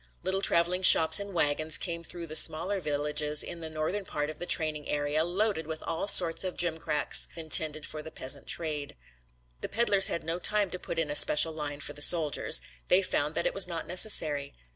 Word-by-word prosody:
Little 190 +1 -1
traveling 175 0 +1
shops 165 -1 +7
in 200 0 -8
wagons 155 -2 +1
came 170 -2 -6
through 170 0 -9
the 155 -1 -11
smaller 180 +6 0
villages 150 -1 -2
in 170 - -9
the 160 -1 -9
northern 155 +6 -5
part 150 -4 -6
of - - -14
the 175 - -7
training 155 -2 0
area 145 +1 -3
loaded 180 -1 -3
with 160 -1 -9
all 165 - -5
sorts 175 -4 +2
of 185 -1 -7
gimcracks 160 -3 0
intended 155 -2 0
for 155 - -8
the 160 - -11
peasant 135 -1 -9
trade. 150 -3 -3 0.7
The - - -7
peddlers 205 -4 +3
had 170 - -5
no 165 +2 -5
time 205 0 0
to 180 - -7
put 170 - -9
in 160 -3 -4
a - - -5
special 150 +2 +7
line 150 -2 -8
for 145 - -9
the 145 - -12
soldiers. 155 -2 +3 0.3
They 185 +2 +3
found 150 -4 -3
that - - -3
it - - -2
was 195 -2 +2
not 170 -2 -7
necessary. 155 -7 +2
160 Hz, 205 wpm, -26 LUFS, 150-180 Hz, 0.7 s, shops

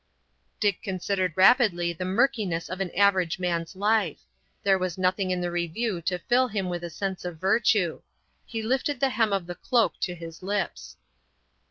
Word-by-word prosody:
Dick 205 -2 +1
considered 185 -1 -1
rapidly 185 -5 +4
the 180 +2 -5
murkiness 200 -5 0
of 185 +1 -4
an 190 - -1
average 190 -4 +3
man's 175 0 -2
life. 205 -4 +1 0.4
There 195 -1 +3
was 185 -1 -2
nothing 185 +1 +1
in 180 -1 0
the 175 0 -2
review 175 +3 -2
to 180 -1 +1
fill 245 +8 +2
him 200 -5 -2
with 175 -1 -4
a 175 - -4
sense 190 +3 -4
of 175 -2 -5
virtue. 195 -2 +2 0.4
He 225 -2 -5
lifted 265 +4 0
the 270 - +3
hem 225 -4 +1
of 195 -3 0
the 175 - -5
cloak 230 +5 +1
to 180 - -2
his 165 -1 -10
lips. 200 +1 -3
190 Hz, 175 wpm, -26 LUFS, 175-215 Hz, 0.4 s, rapidly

